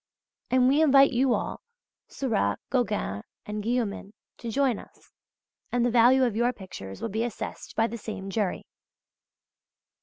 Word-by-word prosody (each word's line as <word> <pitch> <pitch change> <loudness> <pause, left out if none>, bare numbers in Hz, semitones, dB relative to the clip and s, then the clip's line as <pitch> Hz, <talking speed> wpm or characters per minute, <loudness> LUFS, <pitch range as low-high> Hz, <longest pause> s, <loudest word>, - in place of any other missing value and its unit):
And 255 0 +4
we 280 +4 +4
invite 275 -3 +6
you 250 0 +3
all, - - -4 0.5
Seurat, 215 - 0
Gauguin 210 - 0 0.2
and 210 0 -4
Guillaumin 215 -3 -2 0.3
to 235 - -5
join 255 -1 +1
us, - - -17 0.6
and 245 -1 +2
the 245 - +2
value 250 +3 +6
of 240 -4 +1
your 240 +2 +2
pictures 175 - -9
will - - -1
be 220 +3 -1
assessed 240 -3 -6
by 225 - +3
the 235 0 -5
same 195 -2 -6
jury. 200 -3 -1
230 Hz, 150 wpm, -27 LUFS, 205-250 Hz, 0.6 s, invite